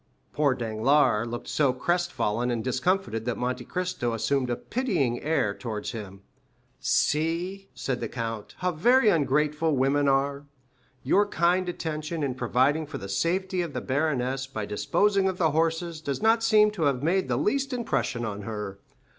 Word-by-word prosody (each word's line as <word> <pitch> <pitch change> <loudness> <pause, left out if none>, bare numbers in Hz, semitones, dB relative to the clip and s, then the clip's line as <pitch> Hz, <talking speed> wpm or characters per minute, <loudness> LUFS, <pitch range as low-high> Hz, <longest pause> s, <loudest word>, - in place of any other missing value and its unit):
Poor 145 -3 +2
Danglars 120 +1 +2
looked 120 +1 -6
so 140 -4 +2
crest 175 +6 0
fallen 115 +4 -1
and 115 -2 -1
discomfited 130 - 0
that 120 - -2
Monte 125 0 -2
Cristo 180 -10 -2
assumed 125 +3 0
a 120 - 0
pitying 175 - -1
air 150 -10 +1
towards 110 -2 -5
him. 100 -4 -8 0.6
"See," 170 +6 0
said 130 -2 -2
the 115 - -3
count, 115 -3 -5
"how 180 0 0
very 235 +8 +4
ungrateful 150 -1 +2
women 140 +2 +2
are. 140 +1 +1 0.6
Your 205 +1 +3
kind 180 0 +1
attention, 155 -1 -4
in 135 -3 -1
providing 130 +5 +1
for 145 -1 -6
the 100 - -7
safety 180 - 0
of 170 -4 -4
the - - -2
baroness 135 -2 -1
by 110 -6 -4
disposing 195 - +1
of 185 - -4
the 160 -4 +2
horses, 165 +1 0
does 140 -3 -3
not 225 +1 +3
seem 215 -2 +5
to 180 -7 -1
have 140 -2 +1
made 185 +2 +1
the 125 -2 0
least 275 - 0
impression 225 - -1
on 105 -2 -4
her. 105 -2 -5
145 Hz, 165 wpm, -27 LUFS, 125-175 Hz, 0.6 s, seem